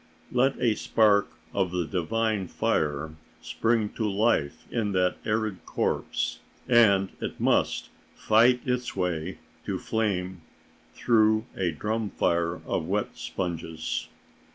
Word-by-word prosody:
Let 130 +2 +2
a 120 -3 +3
spark 105 -2 +3 0.3
of 95 -2 +1
the 90 -1 -1
divine 100 +3 -1
fire 75 -1 -1 0.3
spring 115 -2 0
to 110 -1 -2
life 100 -8 +1
in 105 -4 -1
that 90 -1 +2
arid 110 -3 -1
corpse, - - -1 0.3
and 100 -6 +5
it - - -4
must - - +1 0.3
fight 120 +3 +4
its 125 -1 -1
way 90 -1 -2 0.3
to - - -1
flame 95 -5 -2 0.5
through 110 -1 +3
a 90 -2 0
drum 105 +6 -2
fire 85 -1 0
of 80 -3 -2
wet 100 +3 -1
sponges. 80 -3 -4
100 Hz, 120 wpm, -27 LUFS, 90-110 Hz, 0.5 s, and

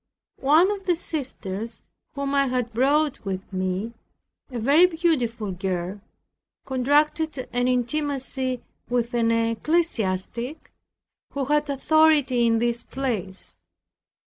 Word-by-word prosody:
One 315 +8 +5
of 395 -2 -5
the 355 - +4
sisters 230 - -5 0.3
whom 280 0 -2
I 275 -1 +3
had 250 -2 -1
brought 285 +4 +2
with 195 0 -5
me, 185 +4 -2 0.6
a 250 - -5
very 285 +10 +5
beautiful 255 - 0
girl, 185 +1 -3 0.6
contracted 290 +2 +1
an 245 0 +1
intimacy 260 0 -1 0.3
with 240 -1 0
an 230 -1 +2
ecclesiastic, 230 - 0 0.6
who 280 -1 -1
had 295 +2 +1
authority 285 -4 +3
in 230 0 +3
this 235 0 0
place. 210 - -3
255 Hz, 110 wpm, -24 LUFS, 230-295 Hz, 0.6 s, One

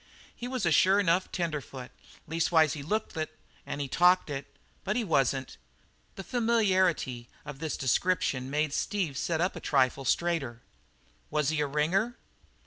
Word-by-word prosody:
"He 245 - -6
was 255 -4 -2
a 170 - +2
sure 190 +6 +5
enough 185 -1 +1
tenderfoot 150 -7 -4 0.4
leastways 160 -1 +3
he 150 - -6
looked 210 +9 -2
it 155 -1 -4 0.3
an' - - -4
he 140 - -2
talked 180 +3 +3
it, 135 -1 -4 0.4
but 210 +1 -1
he 245 - +1
wasn't." 135 - 0 0.6
The 195 - -7
familiarity 190 - +1 0.2
of 145 -2 -8
this 160 -1 -3
description 135 -1 0
made 150 +1 0
Steve 180 -8 -1
sit 160 +4 -1
up 180 +3 0
a - - -5
trifle 135 -1 +1
straighter. 140 -7 0 0.7
"Was 150 -2 +1
he 155 -1 0
a 145 - +1
ringer?" 180 - 0
160 Hz, 155 wpm, -29 LUFS, 140-185 Hz, 0.7 s, sure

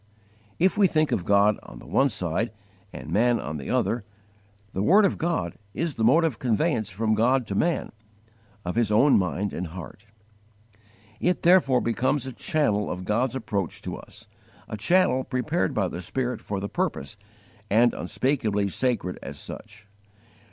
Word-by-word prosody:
If 190 +4 +2
we 200 - +6
think 155 -2 +1
of 90 - -1
God 100 +1 +4
on - - -12
the - - -13
one 140 - +2
side 95 +1 -1 0.4
and 75 - -8
man 115 +5 +3
on 75 +1 -5
the 70 - -7
other, 120 -2 0 0.7
the 95 - -2
word 200 - +5
of 195 - 0
God 160 - -2 0.2
is 165 -2 -1
the 115 - -3
mode 145 +9 +5
of 150 -9 -1
conveyance 120 - 0
from 110 +3 0
God 125 +4 +2
to 100 - -5
man, 165 - 0 0.7
of 90 - -2
His 115 -2 +1
own 130 +7 +5
mind 95 +2 -2
and 90 - -3
heart. 90 +5 -10 1.1
It 180 0 0
therefore 165 -8 +5
becomes 130 +3 0
a 130 - -6
channel 105 -7 0
of 90 +1 -5
God's 120 +6 0
approach 100 -8 -3
to - - -4
us, - - -14 0.4
a - - -5
channel 130 - +2
prepared 140 +7 -1
by 100 -3 +1
the 90 - -6
Spirit 125 +5 -3
for 100 -1 -4
the 100 - -3
purpose, 70 -6 -3 0.5
and 115 +3 +4
unspeakably 110 -7 0
sacred 110 -4 -1
as - - -8
such. 105 0 -10
115 Hz, 165 wpm, -25 LUFS, 100-135 Hz, 1.1 s, we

